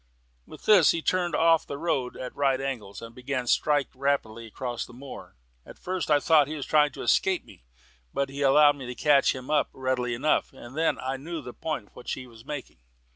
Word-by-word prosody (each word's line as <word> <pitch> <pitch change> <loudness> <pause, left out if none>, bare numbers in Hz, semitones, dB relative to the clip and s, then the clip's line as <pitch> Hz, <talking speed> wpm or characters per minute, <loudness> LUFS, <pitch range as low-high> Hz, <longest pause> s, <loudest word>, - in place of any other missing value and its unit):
With - - -13
this 190 -8 +7
he 165 - +1
turned 180 -2 +1
off 165 -1 +3
the 140 - -5
road 140 -6 -1
at 125 - -7
right 135 -2 +2
angles, 120 -7 -5
and 115 0 -9
began 125 +1 -3
to - - -14
strike 145 +2 +2
rapidly 130 -5 -1
across 120 +2 -4
the - - -12
moor. 135 - -10 0.3
At - - -13
first 185 -2 -3
I 145 -1 +5
thought 150 -1 +4
he 155 - -5
was 145 - -5
trying 150 -1 +4
to - - -7
escape 190 -2 +2
me, - - -17 0.5
but 140 - -1
he 140 +1 -7
allowed 145 +1 +5
me 130 -3 -8
to 125 - -6
catch 145 -1 +3
him 130 +2 -7
up 150 - +2
readily 130 -2 -1
enough, 145 +4 +1
and 130 0 -12
then 160 +1 +1
I 135 +1 -3
knew 165 +5 -6
the 125 - -8
point 155 -10 -4
for - - -15
which - - -4
he 130 - -6
was 115 -2 -15
making. 145 - -7
140 Hz, 225 wpm, -27 LUFS, 125-150 Hz, 0.5 s, this